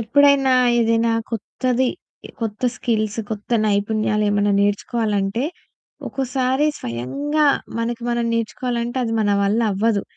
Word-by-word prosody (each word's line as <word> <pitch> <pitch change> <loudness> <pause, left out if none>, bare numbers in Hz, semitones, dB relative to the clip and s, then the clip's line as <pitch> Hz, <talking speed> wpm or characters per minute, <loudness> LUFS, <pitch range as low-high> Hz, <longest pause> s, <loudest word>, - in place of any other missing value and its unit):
ఎప్పుడైనా 275 +3 +4 0.3
ఏదైనా 230 0 +2 0.2
కొత్తది 250 +3 -1 0.5
కొత్త 220 -1 -4
స్కిల్స్ 215 -2 -1
కొత్త 210 0 -6 0.2
నైపుణ్యాలు 210 +1 +1
ఏమన్నా 205 0 +2
నేర్చుకోవాలంటే 205 +1 0 0.6
ఒక్కోసారి 265 +2 0
స్వయంగా 280 - -1 0.3
మనకి 235 +1 -2
మనం 240 0 0
నేర్చుకోవాలంటే 235 +1 -2
అది 225 - -2
మన 205 -1 +2
వల్లవ్వదు. 210 0 +1
230 Hz, 100 wpm, -21 LUFS, 210-250 Hz, 0.6 s, ఎప్పుడైనా